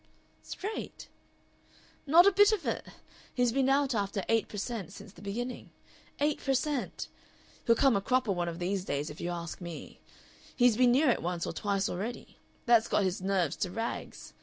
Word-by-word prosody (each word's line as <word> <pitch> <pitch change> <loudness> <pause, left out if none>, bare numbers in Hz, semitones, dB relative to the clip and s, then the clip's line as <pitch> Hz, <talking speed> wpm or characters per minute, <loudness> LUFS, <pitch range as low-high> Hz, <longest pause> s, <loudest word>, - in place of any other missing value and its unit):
"Straight?" 420 +3 -6 1.0
"Not 335 +5 +7
a 400 - +7
bit 410 +2 +6
of 425 -5 -1
it! - - -2 0.5
He's 245 -2 +2
been 270 +1 +2
out 275 -1 +2
after 200 -2 -1
eight 225 -1 +2
per 210 - -8
cent. 205 -3 -4
since 200 -1 -12
the 175 - -15
beginning. 240 +5 -5 0.5
Eight 295 +1 0
per 270 -1 +1
cent.! 290 -1 -2 0.6
He'll 230 - +6
come 270 +1 +4
a 200 - +1
cropper 250 0 +1
one 175 -2 -1
of 165 - -6
these 185 +2 -2
days, 145 -3 -3
if 150 - -10
you 175 - -2
ask 170 +1 -5
me. 170 -2 -8 0.5
He's 245 -3 +4
been 245 +1 +5
near 275 +3 +4
it - - -1
once 175 0 -2
or - - -4
twice 200 +2 -1
already. 215 +7 -5 0.3
That's 235 -2 +5
got 210 - +2
his 185 +2 -1
nerves 190 -4 0
to 185 - -1
rags. 225 +5 -5
220 Hz, 185 wpm, -30 LUFS, 185-260 Hz, 1.0 s, Not